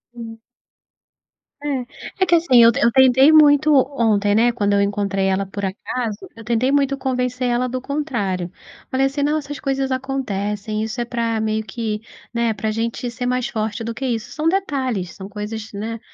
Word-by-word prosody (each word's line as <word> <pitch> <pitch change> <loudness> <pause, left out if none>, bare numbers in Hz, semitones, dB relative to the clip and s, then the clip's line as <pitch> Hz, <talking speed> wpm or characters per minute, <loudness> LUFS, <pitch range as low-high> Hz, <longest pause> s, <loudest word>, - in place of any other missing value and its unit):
Hum. 225 -1 -8 1.2
É. 275 -4 -2 0.4
É - - +4
que 345 -1 +4
assim, 270 -8 +5
eu 230 - +8
eu 235 - +3
tentei 265 +3 +6
muito 300 -1 +6 0.2
ontem, 205 -3 +2
né, 240 +2 +4
quando 205 -4 0
eu 200 - +3
encontrei 200 -1 0
ela 195 +1 0
por 200 +1 -7
acaso, 210 +3 -3 0.2
eu 225 - -11
tentei 240 +4 +1
muito 275 -1 +2
convencer 250 -1 -1
ela 245 +1 +1
do 255 +1 -3
contrário. 210 - -2 0.4
Falei 265 +1 +2
assim: 275 +1 -1
"Não, 300 +2 +1
essas 290 -1 -6
coisas 270 -1 -1
acontecem. 215 -5 -2
Isso 220 +2 -4
é 240 - -1
pra, 230 -2 -1
meio 220 0 -1
que, 220 -3 -4 0.3
né, 235 -1 +1
pra 215 +1 -2
gente 230 +2 -3
ser 245 +1 -5
mais 250 0 0
forte 220 +1 -3
do 230 +1 -4
que 265 +4 -5
isso". 240 -1 -3
São 310 +1 -2
detalhes, 260 - -1
são 195 0 -9
coisas, 210 +1 -6
né, 225 +3 -5
235 Hz, 180 wpm, -20 LUFS, 215-265 Hz, 1.2 s, eu